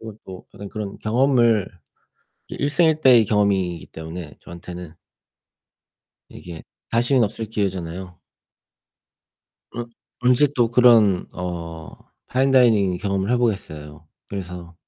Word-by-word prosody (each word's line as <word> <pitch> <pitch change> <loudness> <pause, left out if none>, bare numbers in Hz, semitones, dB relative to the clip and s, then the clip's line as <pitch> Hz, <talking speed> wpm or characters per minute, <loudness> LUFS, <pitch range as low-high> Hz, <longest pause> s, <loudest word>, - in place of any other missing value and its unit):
오 110 -1 -8
또 95 -1 -11
어떤 100 - -8
그런 105 -1 -6
경험을 115 -3 +2 0.8
일생일대의 145 -5 +3
경험이기 95 -5 0
때문에 80 -1 -9
저한테는 85 -1 -10 1.4
이게 85 -2 -10 0.3
다시는 120 +2 +3
없을 110 +2 -4
기회잖아요. 95 -4 -4 1.6
어 120 - -3 0.4
언제 125 +3 +4
또 120 -3 +2
그런 115 -6 +5
어 85 -3 -6 0.4
파인 135 +2 +1
다이닝 110 -8 +4
경험을 100 +1 -2
해 125 - +3
보겠어요. 80 -10 -3 0.2
그래서 90 -3 -7
100 Hz, 240 characters per minute, -22 LUFS, 90-120 Hz, 1.6 s, 그런